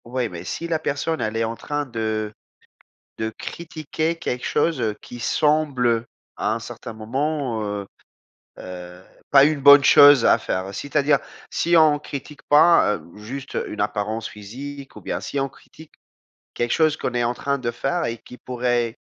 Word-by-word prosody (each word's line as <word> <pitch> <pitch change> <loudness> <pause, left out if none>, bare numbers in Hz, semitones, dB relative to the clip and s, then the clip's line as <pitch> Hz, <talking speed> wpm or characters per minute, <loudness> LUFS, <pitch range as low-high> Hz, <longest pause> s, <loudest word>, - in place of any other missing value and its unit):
Ouais 120 0 -2
mais 85 -2 -8
si 165 - -4
la 165 -2 0
personne 155 +3 -2
elle 110 +1 -2
est 115 - +1
en 115 +1 -2
train 145 +4 -3
de 110 -3 -3 0.9
de 110 0 -2
critiquer 160 +4 -4
quelque 125 -6 -4
chose, 165 -6 +1
heu, 110 -2 -1
qui 120 - -10
semble, 150 -1 +1
heu, 115 0 +1 0.3
à - - 0
un - - -1
certain - - -8
moment, 130 +2 -2
heu 100 -1 -4 0.7
heu, 90 0 -9 0.3
pas 140 0 +8
une 150 -1 +1
bonne 140 +1 +9
chose 145 -3 +8
à - - +6
faire, 95 +1 -3
c'est-à-dire 145 +6 +1 0.3
si 170 0 +2
on 155 -2 +5
critique 145 0 -8
pas, 150 -7 +6
hem, 85 +4 -13
juste 130 +6 -7
une 105 - -7
apparence 105 +2 -2
physique 135 +7 -9
ou - - -10
bien, - - -4
si 140 - -3
on 135 - 0
critique 155 +3 -17 0.6
quelque 120 -1 -1
chose 155 -2 +3
qu'on 125 - -3
est 120 0 +1
en 120 - 0
train 140 +2 -1
de 120 -2 -2
faire 170 +8 -1
et 115 - -3
qui 125 - -13
pourrait 120 -2 -1
125 Hz, 175 wpm, -22 LUFS, 110-145 Hz, 0.9 s, bonne